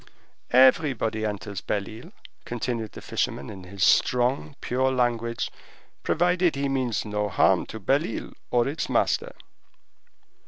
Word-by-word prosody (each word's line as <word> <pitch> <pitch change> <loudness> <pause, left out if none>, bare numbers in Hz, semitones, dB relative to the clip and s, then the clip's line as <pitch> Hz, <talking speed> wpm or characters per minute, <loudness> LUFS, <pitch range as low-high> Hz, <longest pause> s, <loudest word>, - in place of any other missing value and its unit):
"Everybody 130 -4 +4
enters 100 -1 -5
Belle 100 -1 -2
Isle," 110 +1 -10 0.3
continued 120 -2 -3
the - - -10
fisherman 70 - -2
in 95 -3 -10
his 95 +1 -3
strong, 125 +4 +2
pure 130 +2 0
language, 120 -2 -1 0.5
"provided 175 0 +2
he 140 0 -1
means 130 -6 -1
no 105 -1 -1
harm - - +3
to 110 - -7
Belle 135 +9 +1
Isle 115 - -6 0.2
or 120 0 +2
its 145 +4 -3
master." - - +1
120 Hz, 130 wpm, -26 LUFS, 105-135 Hz, 0.5 s, Everybody